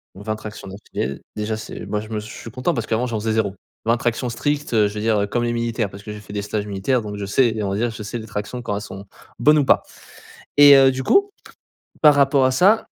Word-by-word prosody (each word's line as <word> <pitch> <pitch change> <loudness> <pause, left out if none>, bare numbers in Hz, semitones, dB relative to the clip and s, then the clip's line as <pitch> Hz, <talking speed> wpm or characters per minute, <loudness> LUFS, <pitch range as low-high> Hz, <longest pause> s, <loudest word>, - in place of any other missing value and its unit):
Donc, 100 +2 -11
20 110 0 -1
tractions 110 -1 -9
d'affilée, 95 -8 -5
déjà, 105 +1 -2
c'est 110 - -8
moi, 105 - -2
je 110 - -10
me 110 - -3
s 105 - -5
je 110 - -9
suis - - -9
content 130 +9 -1
parce 115 -4 -3
qu'avant, 115 +3 0
j'en 115 -3 -2
faisais 110 +1 -1
0. 110 -3 0 0.3
20 115 +2 +3
tractions 120 +1 -1
strictes, 145 +4 -2
heu, 105 -2 +4
je 100 - -7
veux 105 - -3
dire, 110 0 +2
heu, 100 - -1
comme 120 +3 -1
les 120 0 0
militaires 115 -2 -1
parce 100 +1 -12
que 105 - -7
j'ai 105 - -8
fait 100 0 -11
des 105 - -2
stages 105 0 -3
militaires 105 +6 0
donc 105 -1 -6
je 100 - -4
sais 120 +5 +3
et 110 - -2
on 100 - -1
va 95 - -1
dire, 120 +3 0
je 110 -1 -8
sais 105 +4 -5
les 110 - -8
tractions 105 +4 -5
quand 105 -4 -3
elles 100 - -4
sont 95 0 -9 0.3
bonnes 150 +5 +5
ou 145 - +2
pas - - +4 0.8
et 145 -1 +9
heu, 135 -1 +6
du 130 0 -4
coup, 400 - +3 0.7
par 150 -2 +8
rapport 140 -1 +4
à - - +2
ça, 200 +11 +4
110 Hz, 280 wpm, -21 LUFS, 105-125 Hz, 0.8 s, et